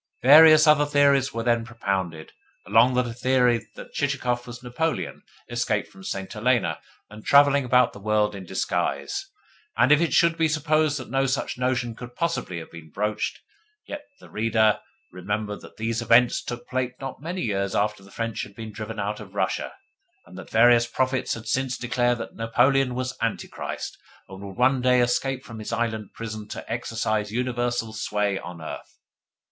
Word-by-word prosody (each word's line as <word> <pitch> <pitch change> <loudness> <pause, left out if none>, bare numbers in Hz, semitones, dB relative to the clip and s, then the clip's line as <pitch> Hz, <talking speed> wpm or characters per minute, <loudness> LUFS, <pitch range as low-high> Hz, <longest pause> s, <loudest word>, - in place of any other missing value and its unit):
Various 155 +3 +9
other 150 -1 +5
theories 140 -2 +3
were 115 0 -3
then 115 -1 +2
propounded, 95 -9 -3 0.3
among 120 +3 +4
them 125 0 +2
a 120 - -5
theory 125 -1 +2
that - - -11
Chichikov 125 -4 -1
was 120 0 -9
Napoleon, 155 +7 -2 0.3
escaped 120 -3 -1
from 195 0 -14
St. 95 - -5
Helena 110 -7 +1 0.3
and 105 0 -11
travelling 140 -1 +5
about 125 0 +4
the - - -11
world 105 0 +1
in 100 -1 -7
disguise. 95 - -2 0.5
And 130 - +4
if 150 +2 +6
it 170 - +1
should 170 -1 +3
be 160 - +4
supposed 155 -1 +1
that 130 -4 -8
no 135 0 +2
such 135 -1 -2
notion 125 -2 0
could 120 +1 -10
possibly 165 - -2
have 80 - -8
been 80 -1 -11
broached, 105 +5 -2 0.5
let 295 - -6 0.2
the - - -16
reader 110 -1 +2 0.3
remember 105 +3 -3
that - - -14
these 115 +1 -2
events 120 +1 +4
took 120 0 -6
place 130 -1 -2
not 135 0 -7
many 175 +4 -4
years 100 -3 -1
after 105 0 0
the 100 - -16
French 115 +2 -3
had 100 - -9
been 110 -1 -8
driven 110 +1 -6
out 105 +1 -2
of - - -12
Russia, - - -1 0.5
and - - -15
that - - -10
various 120 +1 +5
prophets 130 0 -1
had 115 0 -9
since 130 +2 -1
declared 120 0 0
that 115 - -7
Napoleon 125 +3 +2
was 130 +1 -3
Antichrist, 115 -1 -4 0.3
and 95 0 -10
would 100 -1 -9
one 130 +1 +3
day 125 0 +4
escape 130 +2 0
from 115 -4 -9
his 110 - -6
island 110 -3 -2
prison 110 -2 -6
to - - -8
exercise 110 -3 -2
universal 120 -1 -1
sway 105 -2 -1
on 85 -2 -9
earth. - - -8
120 Hz, 175 wpm, -25 LUFS, 105-130 Hz, 0.5 s, Various